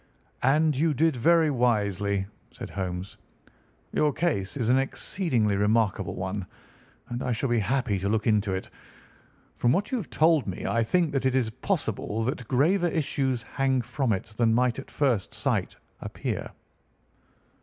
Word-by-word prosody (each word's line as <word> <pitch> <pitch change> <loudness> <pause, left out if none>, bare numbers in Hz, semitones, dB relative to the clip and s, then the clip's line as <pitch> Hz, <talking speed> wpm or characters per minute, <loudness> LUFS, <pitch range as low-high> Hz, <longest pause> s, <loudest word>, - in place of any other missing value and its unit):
"And 150 +3 +3
you 155 +2 +1
did 160 +1 +2
very 160 +4 +4
wisely," 100 -6 +1 0.2
said - - -9
Holmes. 90 0 -4 0.8
"Your 150 -1 +3
case 145 - -1
is 120 -5 0
an 130 +2 +5
exceedingly 135 - 0
remarkable 105 -1 +1
one, 95 +1 -4 0.6
and 120 +1 -4
I 125 - -1
shall 120 +4 -1
be 120 -1 +2
happy 110 -1 0
to 100 +2 -1
look 110 0 0
into 105 -2 +2
it. 95 - -6 0.9
From 120 - +2
what 195 +9 0
you 260 - +1
have 195 - -7
told 160 -4 +3
me 95 - -4
I 115 - +1
think 165 +7 +1
that 135 -1 +1
it 130 - 0
is 120 -4 +1
possible 110 0 -2
that 125 -1 -3
graver 170 +8 +3
issues 135 -6 -1
hang 135 0 0
from 130 0 -1
it 105 +2 -3
than 115 -2 +3
might 125 +1 +2
at 135 - -9
first 125 -9 0
sight - - -1 0.2
appear." - - -4
125 Hz, 160 wpm, -27 LUFS, 105-145 Hz, 0.9 s, an